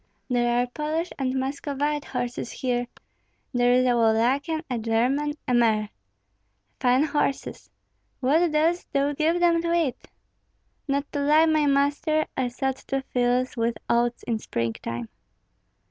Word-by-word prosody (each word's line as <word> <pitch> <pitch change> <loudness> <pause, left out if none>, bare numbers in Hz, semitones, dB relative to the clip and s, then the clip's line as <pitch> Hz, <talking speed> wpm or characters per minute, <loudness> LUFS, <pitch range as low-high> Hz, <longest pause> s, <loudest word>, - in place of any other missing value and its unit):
There 240 -1 +2
are 245 - +2
Polish 305 +6 -3
and 260 -1 -1
Muscovite 285 +2 -2
horses 245 -1 -4
here, 245 -1 -2 0.7
there 245 0 +3
is 255 +1 +4
a 250 - +3
Wallachian, 245 +8 +2
a 245 -2 -2
German, 250 +7 0
a 250 - +1
mare. 220 -3 +3 0.9
Fine 255 +3 +3
horses! 295 -2 -2 0.5
What 315 +6 +2
dost 325 +3 +1
thou 280 +1 +1
give 320 +4 +1
them 340 -1 +3
to 335 0 -1
eat?" 325 -7 -1 0.8
"Not 280 0 0
to 290 - -2
lie, 305 +3 +5
my 310 -2 +2
master, 285 +3 +2
I 260 -1 0
sowed 265 +2 -2
two 270 0 -3
fields 250 +1 +1
with 230 -1 -1
oats 240 0 +1
in 230 -2 -2
springtime." 115 - -4
265 Hz, 140 wpm, -25 LUFS, 245-300 Hz, 0.9 s, lie